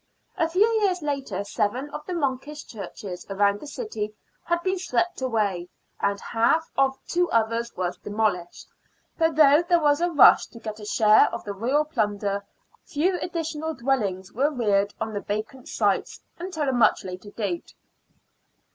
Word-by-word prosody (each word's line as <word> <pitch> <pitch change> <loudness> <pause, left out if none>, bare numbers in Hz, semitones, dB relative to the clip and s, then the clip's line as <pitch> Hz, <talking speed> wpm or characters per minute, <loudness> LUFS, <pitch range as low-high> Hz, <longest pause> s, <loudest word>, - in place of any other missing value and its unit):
A 325 - +1
few 370 +5 +4 0.2
years 365 -5 +1
later 270 -10 -2
seven 240 +8 -2
of 300 +1 -6
the 365 - -3
monkish 290 0 -3
churches 195 -3 -8
around 200 +1 +2
the 300 - -9
city 220 - -5 0.3
had 345 0 0
been 375 0 0
swept 355 -3 -1
away, 205 -8 -1 0.3
and 200 0 0
half 240 +11 +1
of 270 0 +2
two 355 0 +1
others 230 +1 +1
was 180 -1 -2
demolished; 205 -5 -2 0.5
but 325 -2 +2
though 295 0 +7
there 345 0 +3
was 295 0 +3
a 350 - +2
rush 295 -6 +7
to 230 - -13
get 220 -1 -6
a 210 - -8
share 215 0 +5
of - - -5
the 205 - -5
royal 260 +9 +1
plunder, 205 -7 -1 0.4
few 355 +5 0
additional 320 -2 -3
dwellings 205 -7 -1
were 275 +6 +2
reared 205 -7 +1
on 220 0 -3
the 205 - -3
vacant 215 +5 -5
sites 205 -3 0 0.2
until 335 -5 -3
a 265 - +1
much 240 -2 +3
later 185 +2 -7
date. 200 -5 -4
245 Hz, 165 wpm, -25 LUFS, 205-310 Hz, 0.5 s, though